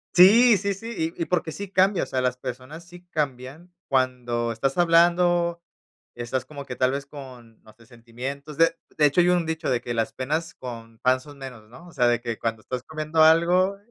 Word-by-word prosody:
Sí, 215 +5 +7
sí, 200 +1 -2
sí, 195 -5 -4
y - - -8
y - - 0
porque 175 -2 -1
sí 200 +4 -7
cambia, 190 0 +2
o - - -3
sea, 130 - -2
las 125 0 -1
personas 130 +6 -8
sí 175 0 -15
cambian 145 +3 -4 0.2
cuando 125 -3 0
estás 135 +4 -2
hablando, 170 0 +3 0.5
estás 120 +2 -3
como 140 0 -9
que 125 - -7
tal 130 +1 +2
vez 140 0 -4
con, 125 -6 -13
no 110 - -18
sé, 115 +1 -21
sentimientos, 130 +5 -8
de 165 0 +3 0.2
de 150 - +4
hecho 145 +5 +4
hay 175 - +2
un 175 -2 +2
dicho 160 0 -3
de 125 - +1
que: 120 - -4
"Las 115 -1 -1
penas 155 +6 -3
con 115 -3 -9
pan 130 +1 +2
son 145 +1 -14
menos", 125 -5 -10
¿no?, 165 +9 -14
o - - -14
sea, 125 - +2
de 120 -1 +2
que 115 -2 -5
cuando 115 -1 -3
estás 125 +1 -5
comiendo 155 0 -1
algo, 175 +5 +4
140 Hz, 210 wpm, -24 LUFS, 125-170 Hz, 0.5 s, Sí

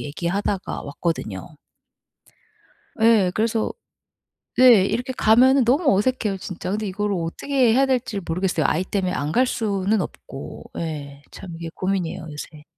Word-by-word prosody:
얘기하다가 180 +6 -3
왔거든요. 140 - -4 1.5
예, 220 -5 +5
그래서 220 +1 0 0.9
네 245 -6 +7
이렇게 250 +5 -2
가면 255 +4 +5
너무 270 - +3
어색해요, 210 -3 0
진짜. 185 -1 -6
근데 215 +2 -2
이걸 205 +2 -2
어떻게 225 +8 +1
해야 270 +2 +4
될지를 250 -6 -1
모르겠어요. 175 -1 0
아이 170 - +1
때문에 185 -2 -2
안 145 -2 -2
갈 255 +7 +3
수는 205 -3 0
없고. 135 - -8
예. 145 -4 -5
참 180 -3 -9
이게 165 0 -6
고민이에요, 185 -4 -2
요새. 150 0 -9
195 Hz, 310 characters per minute, -22 LUFS, 165-230 Hz, 1.5 s, 네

